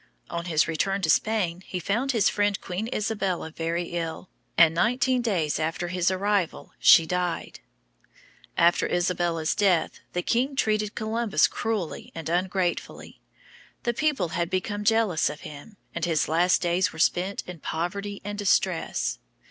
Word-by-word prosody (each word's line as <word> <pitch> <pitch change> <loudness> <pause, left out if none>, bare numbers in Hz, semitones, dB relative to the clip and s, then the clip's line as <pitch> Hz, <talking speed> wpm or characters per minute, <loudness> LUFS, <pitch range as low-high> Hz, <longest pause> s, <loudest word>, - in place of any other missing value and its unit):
On 170 0 -3
his 160 -3 +2
return 195 +4 -1
to 160 - +4
Spain 185 -4 +1
he 185 - -5
found 230 +10 0
his 225 -6 +3
friend 205 -1 +1
Queen 190 +5 -4
Isabella 195 -6 -2
very 165 +2 -2
ill, 170 +1 -4 0.3
and 165 -1 +7
nineteen 250 +7 +2
days 175 -11 0
after 165 +2 -2
his 180 0 +1
arrival 195 -1 -1
she 165 - +7
died. 180 0 -2 1.0
After 170 +1 +4
Isabella's 175 -2 0
death 185 -5 +1
the 180 - -1
king 260 +4 0
treated 215 -4 0
Columbus 220 -6 +1
cruelly 215 -7 -3
and 165 -1 -5
ungratefully. 180 +1 -2 0.6
The 240 - 0
people 275 - 0
had 170 +1 -2
become 205 +3 -2
jealous 215 -6 +2
of 150 - -8
him, 150 +8 -11 0.2
and - - -4
his 165 -3 +1
last 175 +4 +2
days 175 +2 +1
were - - -12
spent 180 +4 +1
in 180 -2 -8
poverty 200 +7 -4
and 205 0 -4
distress. 190 -3 0
185 Hz, 150 wpm, -26 LUFS, 170-210 Hz, 1.0 s, and